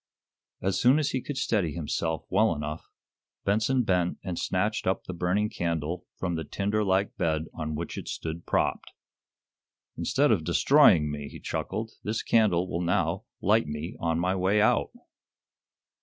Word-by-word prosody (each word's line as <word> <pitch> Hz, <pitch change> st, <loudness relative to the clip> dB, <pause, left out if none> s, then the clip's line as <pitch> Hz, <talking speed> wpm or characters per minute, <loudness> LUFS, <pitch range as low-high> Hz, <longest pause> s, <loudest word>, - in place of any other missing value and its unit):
As 95 Hz, +1 st, +1 dB
soon 125 Hz, +4 st, +6 dB
as 150 Hz, -2 st, 0 dB
he 130 Hz, -, -1 dB
could 145 Hz, +1 st, -5 dB
steady 105 Hz, -, 0 dB
himself 80 Hz, 0 st, -2 dB
well 105 Hz, 0 st, +3 dB
enough, 75 Hz, +2 st, -6 dB, 0.6 s
Benson 110 Hz, +6 st, +2 dB
bent 90 Hz, -4 st, +1 dB
and 90 Hz, -2 st, -4 dB
snatched 105 Hz, +3 st, -1 dB
up 95 Hz, -, 0 dB
the 95 Hz, -, -6 dB
burning 90 Hz, +4 st, +1 dB
candle 85 Hz, -2 st, -3 dB
from 90 Hz, -2 st, -2 dB
the 80 Hz, -1 st, -2 dB
tinder 100 Hz, +7 st, -1 dB
like 95 Hz, 0 st, +1 dB
bed 80 Hz, -1 st, 0 dB
on 75 Hz, -1 st, -4 dB
which 85 Hz, +2 st, -4 dB
it -, -, -9 dB
stood 80 Hz, +1 st, -5 dB
propped. -, -, 0 dB, 1.0 s
"Instead -, -, +2 dB
of -, -, +2 dB
destroying 75 Hz, -2 st, +5 dB
me," 75 Hz, -1 st, -5 dB
he -, -, -10 dB
chuckled, 110 Hz, +1 st, -4 dB
"this 110 Hz, +2 st, -2 dB
candle 95 Hz, -6 st, +3 dB
will 85 Hz, -1 st, -2 dB
now 90 Hz, 0 st, 0 dB, 0.2 s
light 105 Hz, -3 st, +3 dB
me 75 Hz, +8 st, -5 dB
on 80 Hz, -1 st, 0 dB
my 90 Hz, +2 st, +1 dB
way 95 Hz, +3 st, +2 dB
out." 105 Hz, -, +3 dB
90 Hz, 160 wpm, -27 LUFS, 80-105 Hz, 1.0 s, soon